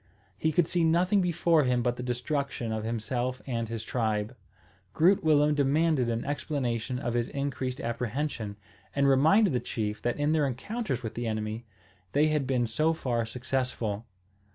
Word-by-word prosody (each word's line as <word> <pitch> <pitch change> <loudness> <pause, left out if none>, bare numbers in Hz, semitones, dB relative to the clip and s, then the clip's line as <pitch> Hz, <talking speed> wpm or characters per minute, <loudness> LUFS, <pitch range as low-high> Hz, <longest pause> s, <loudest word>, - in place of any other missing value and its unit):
He 160 - 0
could 160 +1 +3
see 175 -1 +1
nothing 180 +5 +3
before 170 -2 +3
him 125 -2 +1
but 120 0 +1
the 125 - -6
destruction 125 0 -2
of 110 -1 -2
himself 120 +3 -2
and 115 -4 -2
his 115 -1 -4
tribe. 110 -1 -1 0.6
Groot 180 +5 +4
Willem 150 -1 +4
demanded 145 -2 +2
an 115 0 -2
explanation 130 -5 -2
of 120 -3 -2
his 120 -1 0
increased 135 -2 -3
apprehension, 115 -2 -3 0.4
and 140 0 +3
reminded 160 +8 +5
the 125 - +2
chief 105 -3 -3
that 120 - -1
in 145 +1 +1
their 155 -3 +3
encounters 135 - -3
with 110 -1 -4
the 120 +1 -3
enemy 110 +1 -3 0.5
they 150 +2 +4
had 150 -3 0
been 125 -2 +1
so 155 +9 +1
far 120 -7 -1
successful. 120 -3 -2
130 Hz, 165 wpm, -28 LUFS, 115-150 Hz, 0.6 s, reminded